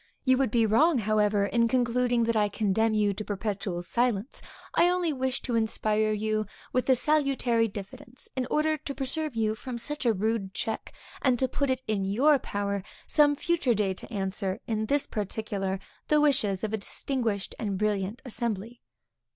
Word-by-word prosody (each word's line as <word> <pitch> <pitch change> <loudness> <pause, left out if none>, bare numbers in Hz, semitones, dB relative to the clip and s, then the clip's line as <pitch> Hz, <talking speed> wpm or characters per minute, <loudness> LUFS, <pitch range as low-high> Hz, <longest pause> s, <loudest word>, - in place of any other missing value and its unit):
You 260 0 +4
would 270 -3 +2
be 230 +1 +3
wrong, 275 +9 +4
however, 210 -2 +2
in 235 +2 +2
concluding, 245 -1 +2
that 230 0 +1
I 210 -1 +3
condemn 215 +2 +1
you 205 -1 +2
to 215 - -5
perpetual 200 -3 -3
silence; 235 +3 -1 0.3
I 350 - +5
only 355 -3 +1
wish 260 -1 -2
to 245 - -3
inspire 215 -1 +1
you 215 0 -1 0.3
with 255 +1 0
a 260 - +7
salutary 260 -5 +2
diffidence, 210 +5 -9
in 255 -2 -1
order 310 +1 +2
to 280 -1 -6
preserve 290 +1 -2
you 220 -1 +1
from 240 +2 -6
such 295 +6 -2
a - - +6
rude 210 -1 -1
check, 220 - -3 0.3
and 255 -3 +3
to 260 - +1
put 280 +2 -1
it 260 0 0
in 210 -3 0
your 265 +10 +4
power 200 -3 -2 0.2
some 290 -1 +4
future 285 -6 +1
day 200 -2 +1
to 190 - -10
answer, 195 -2 -2
in 220 -1 -1
this 285 +2 +2
particular, 200 -2 -3 0.3
the 300 - +4
wishes 255 -10 +2
of 220 0 -2
a - - +1
distinguished 220 -1 -2
and 200 -3 -2
brilliant 205 +2 -1
assembly. 235 -1 -4
225 Hz, 175 wpm, -28 LUFS, 205-260 Hz, 0.3 s, a